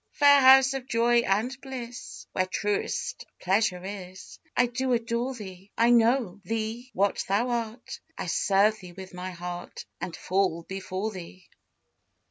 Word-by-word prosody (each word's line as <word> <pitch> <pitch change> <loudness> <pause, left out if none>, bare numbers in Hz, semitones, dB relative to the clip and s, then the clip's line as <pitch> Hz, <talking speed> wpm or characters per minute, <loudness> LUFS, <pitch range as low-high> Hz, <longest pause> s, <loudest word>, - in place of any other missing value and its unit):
Fair 285 -1 +6
house 265 0 +7
of 265 -1 -5
joy 235 0 +3
and 235 +3 0
bliss 250 -3 -8
Where 185 - 0
truest 205 +2 -2
pleasure 185 -1 +1
is, 190 -2 -9 0.2
I 245 - +5
do 250 +1 -1
adore 235 +2 -1
thee; 195 -3 -10
I 235 +1 +4
know 230 -4 +3
thee 225 +4 -3
what 200 +1 +1
thou 210 +6 +1
art, 235 0 -4 0.2
I - - -4
serve 210 +2 +2
thee 180 -3 -11
with 190 0 -10
my 180 +1 -5
heart, 175 0 -7
And 170 - -5
fall 185 -3 0
before 190 +3 -4
thee. 185 -1 -10
215 Hz, 145 wpm, -27 LUFS, 185-240 Hz, 0.2 s, house